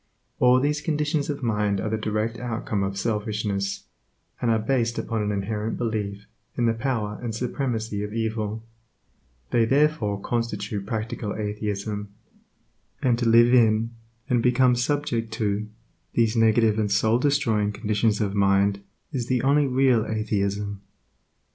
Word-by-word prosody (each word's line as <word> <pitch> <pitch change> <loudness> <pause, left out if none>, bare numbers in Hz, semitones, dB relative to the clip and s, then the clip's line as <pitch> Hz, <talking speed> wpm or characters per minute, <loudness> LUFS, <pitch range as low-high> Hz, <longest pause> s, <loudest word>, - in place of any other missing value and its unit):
All 125 0 +5
these 150 +3 0
conditions 150 -2 -1
of 145 -2 -3
mind 105 -3 +1
are 110 - -2
the - - +1
direct 110 +2 -2
outcome 115 -4 -2
of 95 0 -2
selfishness, 105 -2 -2 0.6
and 120 - +1
are 115 - +4
based 115 +1 0
upon 115 -2 -2
an 105 0 -1
inherent 105 +2 -2
belief 105 -3 -3 0.3
in 120 - +2
the 115 - +3
power 115 -4 -2
and 115 -3 -4
supremacy 115 -4 -2
of 105 - -5
evil; 110 -1 -2 0.9
they 115 - +4
therefore 135 -5 +2
constitute 105 -3 -3
practical 110 -1 -3
atheism; 105 -1 -3 0.9
and 120 -2 +2
to 120 -2 +2
live 120 +2 +6
in, 115 -1 +4 0.4
and 120 -2 +2
become 125 +1 +4
subject 120 -3 -1
to, 105 -2 -1 0.5
these 115 -1 +2
negative 110 -1 +3
and 105 -2 0
soul 110 +3 +3
destroying 115 -7 +1
conditions 105 0 0
of 100 -2 0
mind 100 0 +2 0.3
is 125 -5 -3
the 125 -2 +1
only 140 +1 +3
real 130 -3 +3
atheism. 100 -2 -2
110 Hz, 140 wpm, -25 LUFS, 105-120 Hz, 0.9 s, live